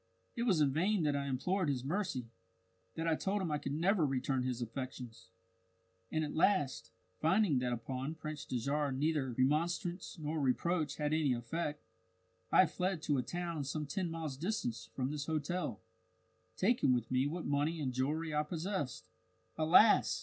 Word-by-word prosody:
It 235 - -2
was 180 -8 +4
in 140 -2 +4
vain 185 +4 +2
that 145 -2 +2
I 140 0 -1
implored 165 +7 0
his 130 -3 -1
mercy 140 - -2 0.6
that 165 +1 -2
I 165 - +3
told 195 +6 0
him 180 -5 -2
I 150 - 0
could 140 - -3
never 180 +3 +3
return 135 -1 0
his 125 -1 -2
affections. 120 -4 -6 0.8
And 155 - +1
at 150 - -3
last, 165 -5 +2 0.3
finding 165 -3 +3
that 125 -1 -1
upon 130 +5 -3
Prince 155 -2 -6
Dajarah 140 +3 -1
neither 150 -2 +1
remonstrance 170 - 0
nor 155 0 -2
reproach 155 +4 +1
had 150 0 -1
any 155 -4 +3
effect, 150 +5 -3 0.7
I 185 - +7
fled 180 0 -2
to 145 -3 +1
a - - +2
town 170 +1 -3
some 150 +2 -3
ten 175 +5 -2
miles 160 -5 -4
distant 120 - -2
from 130 +1 -1
this 145 -1 -4
hotel, 155 - -2 0.8
taking 200 - +3
with 120 -1 -3
me 130 +2 +2
what 165 +3 -4
money 145 +3 0
and 130 -4 -2
jewellery 150 +5 -1
I 150 - +3
possessed. 150 - -3 0.5
"Alas! 170 +7 +5
150 Hz, 165 wpm, -34 LUFS, 130-170 Hz, 0.8 s, I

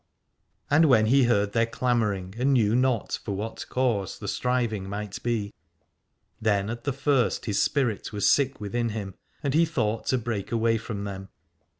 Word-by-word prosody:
And 155 +3 +6
when 120 -7 +5
he 130 +3 +4
heard 105 -4 +2
their 115 0 +2
clamouring, 105 -7 -1
and 135 +2 +3
knew 110 -3 +3
not 125 -2 +1
for 100 - -3
what 110 +3 -5
cause 115 -7 0
the 100 - -7
striving 115 -4 -1
might 100 0 -5
be, 110 -4 -2 0.9
then 105 -1 +1
at 120 0 -7
the 140 - +1
first 135 -2 +1
his 105 -3 +1
spirit 125 -7 0
was 105 -1 0
sick 135 -2 +3
within 115 +3 -2
him, 105 -3 -5 0.3
and 140 -2 0
he 160 +3 +5
thought 115 -9 -1
to 130 - +2
break 110 -4 -4
away 115 -1 +2
from 105 -3 -5
them. 95 -1 -6
115 Hz, 175 wpm, -26 LUFS, 105-125 Hz, 0.9 s, And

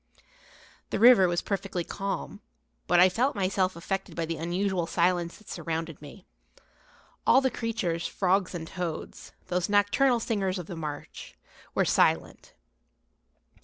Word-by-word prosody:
The - - -1
river 225 -4 +7
was 175 0 -1
perfectly 195 -3 -3
calm, 195 +3 -5 0.5
but 175 - +4
I 180 - +8
felt 240 +9 0
myself 190 -2 0
affected 195 +3 -4
by 165 - -1
the 165 0 -4
unusual 175 +2 -1
silence 175 0 0
that 215 - -21
surrounded 165 -2 -4
me. 145 -1 -12 1.0
All - - +7
the 265 -1 +1
creatures, 195 -8 -2
frogs 190 0 0
and 165 -2 -5
toads, 175 -3 -6 0.2
those 180 +2 0
nocturnal 205 +5 +3
singers 200 -5 -1
of 180 - -5
the 175 - -7
marsh, 150 -3 -7 0.4
were - - +3
silent. - - +1
185 Hz, 135 wpm, -28 LUFS, 170-200 Hz, 1.0 s, I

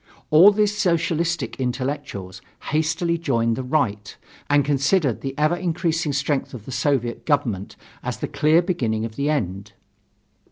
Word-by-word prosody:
All 165 +6 +9
these 210 0 +1
"Socialistic" 170 -4 0
intellectuals 125 -7 -4 0.3
hastily 165 +2 0
joined 115 -7 +1
the 130 - -3
Right 125 -7 -1 0.3
and 145 -1 +4
considered 140 - +1
the 135 0 -5
ever 155 +3 +2
increasing 165 -3 -1
strength 140 -1 -1
of 110 -4 -10
the - - -8
Soviet 125 -4 -1
government 120 -10 -1 0.3
as - - -4
the - - -3
clear 155 +3 +3
beginning 115 - -1
of 110 -1 -7
the 140 +4 -1
end. 100 -7 -2
145 Hz, 145 wpm, -22 LUFS, 120-165 Hz, 0.3 s, All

